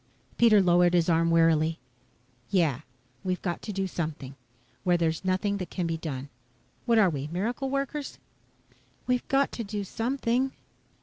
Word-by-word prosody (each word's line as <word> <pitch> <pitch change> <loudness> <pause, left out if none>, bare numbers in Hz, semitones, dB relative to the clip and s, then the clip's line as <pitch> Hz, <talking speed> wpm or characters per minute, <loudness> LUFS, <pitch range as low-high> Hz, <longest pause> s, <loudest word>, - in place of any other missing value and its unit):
Pete 235 -2 +5
lowered 180 -3 +5
his 170 0 +3
arm 165 0 +3
wearily. 165 -1 +3 0.7
"Yeah 160 -9 +2 0.4
we've 185 -1 -2
got 175 -2 -2
to 215 - -5
do 195 -1 -1
something. 155 -7 -5 0.5
Where 180 -2 +3
there's 165 0 -1
nothing 190 +2 0
that 185 -4 -5
can 180 - -3
be 165 0 -1
done. 140 -4 -5 0.6
What 230 -1 +4
are 215 -3 +6
we 140 -1 -4
miracle 235 +9 -2
workers?" 275 +1 -3 0.9
"We've 250 -1 0
got 275 0 +2
to 235 - -4
do 205 0 -4
something." 245 +4 -1
185 Hz, 150 wpm, -27 LUFS, 165-230 Hz, 0.9 s, are